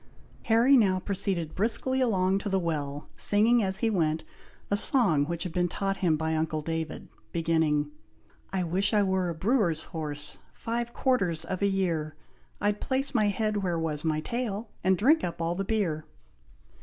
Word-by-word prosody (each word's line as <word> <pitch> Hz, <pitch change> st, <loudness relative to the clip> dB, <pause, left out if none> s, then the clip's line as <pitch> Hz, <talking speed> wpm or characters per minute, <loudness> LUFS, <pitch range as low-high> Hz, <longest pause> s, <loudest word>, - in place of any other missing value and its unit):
Harry 235 Hz, +4 st, +5 dB
now 195 Hz, -7 st, +3 dB
proceeded 185 Hz, -5 st, -2 dB
briskly 250 Hz, +5 st, +2 dB
along 195 Hz, -5 st, +2 dB
to 205 Hz, -, -4 dB
the 195 Hz, -, +1 dB
well, 150 Hz, -5 st, -3 dB
singing 225 Hz, +4 st, +4 dB
as 190 Hz, -2 st, -1 dB
he 230 Hz, -, +2 dB
went, 160 Hz, -5 st, 0 dB, 0.5 s
a -, -, +4 dB
song 200 Hz, -, +4 dB
which 170 Hz, 0 st, -3 dB
had 180 Hz, -, -5 dB
been 180 Hz, 0 st, +1 dB
taught 195 Hz, +3 st, -2 dB
him 165 Hz, -4 st, +1 dB
by 160 Hz, +1 st, -1 dB
uncle 155 Hz, 0 st, -1 dB
David, 160 Hz, -1 st, -4 dB, 0.2 s
beginning, 160 Hz, -3 st, +1 dB, 0.6 s
I 190 Hz, -1 st, -1 dB
wish 190 Hz, +5 st, 0 dB
I 205 Hz, -, +4 dB
were 190 Hz, -2 st, 0 dB
a 170 Hz, -, -4 dB
brewer's 185 Hz, -, +1 dB
horse, 150 Hz, -3 st, -4 dB
Five 235 Hz, +1 st, -3 dB
quarters 180 Hz, -, 0 dB
of 185 Hz, +2 st, -4 dB
a 200 Hz, -, +3 dB
year, 170 Hz, -6 st, -1 dB, 0.4 s
I'd 205 Hz, 0 st, 0 dB
place 270 Hz, +1 st, -1 dB
my 215 Hz, -4 st, +3 dB
head 215 Hz, +1 st, 0 dB
where 180 Hz, -4 st, -1 dB
was 155 Hz, -2 st, -2 dB
my 155 Hz, -1 st, 0 dB
tail, 225 Hz, +1 st, -4 dB
And 185 Hz, 0 st, +3 dB
drink 295 Hz, -, +4 dB
up 170 Hz, -, -3 dB
all 165 Hz, 0 st, 0 dB
the 195 Hz, +3 st, -2 dB
beer. 170 Hz, -8 st, -1 dB
185 Hz, 175 wpm, -28 LUFS, 160-210 Hz, 0.6 s, Harry